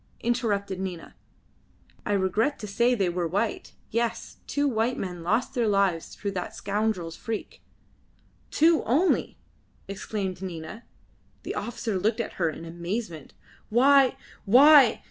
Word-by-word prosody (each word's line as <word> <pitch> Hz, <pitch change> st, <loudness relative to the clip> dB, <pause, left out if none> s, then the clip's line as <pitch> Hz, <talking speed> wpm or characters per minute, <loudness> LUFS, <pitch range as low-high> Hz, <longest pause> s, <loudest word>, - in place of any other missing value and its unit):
interrupted 205 Hz, -5 st, -1 dB
Nina. 185 Hz, -3 st, -6 dB, 0.9 s
"I 205 Hz, -, +1 dB
regret 205 Hz, +9 st, +1 dB
to -, -, -7 dB
say 235 Hz, +5 st, +2 dB
they 195 Hz, -5 st, +1 dB
were 175 Hz, -1 st, -1 dB
white. 205 Hz, +6 st, -2 dB, 0.2 s
Yes, 230 Hz, 0 st, -2 dB
two 285 Hz, 0 st, 0 dB
white 235 Hz, 0 st, 0 dB
men 180 Hz, -2 st, -5 dB
lost 220 Hz, +9 st, 0 dB
their 240 Hz, -4 st, +1 dB
lives 195 Hz, -5 st, 0 dB
through 200 Hz, -, -4 dB
that 180 Hz, -2 st, -5 dB
scoundrel's 200 Hz, -5 st, -2 dB
freak." 225 Hz, -2 st, -6 dB, 0.9 s
"Two 325 Hz, +1 st, +4 dB
only!" 300 Hz, -, +1 dB, 0.5 s
exclaimed 195 Hz, -2 st, -4 dB
Nina. 185 Hz, +4 st, -7 dB, 0.6 s
The -, -, -4 dB
officer 225 Hz, -4 st, -3 dB
looked 215 Hz, +5 st, 0 dB
at 230 Hz, -, -3 dB
her 165 Hz, -, +3 dB
in 160 Hz, +1 st, -8 dB
amazement. 170 Hz, 0 st, -5 dB, 0.3 s
"Why! 265 Hz, +3 st, +5 dB, 0.3 s
why! 270 Hz, +4 st, +7 dB
210 Hz, 130 wpm, -26 LUFS, 185-235 Hz, 0.9 s, why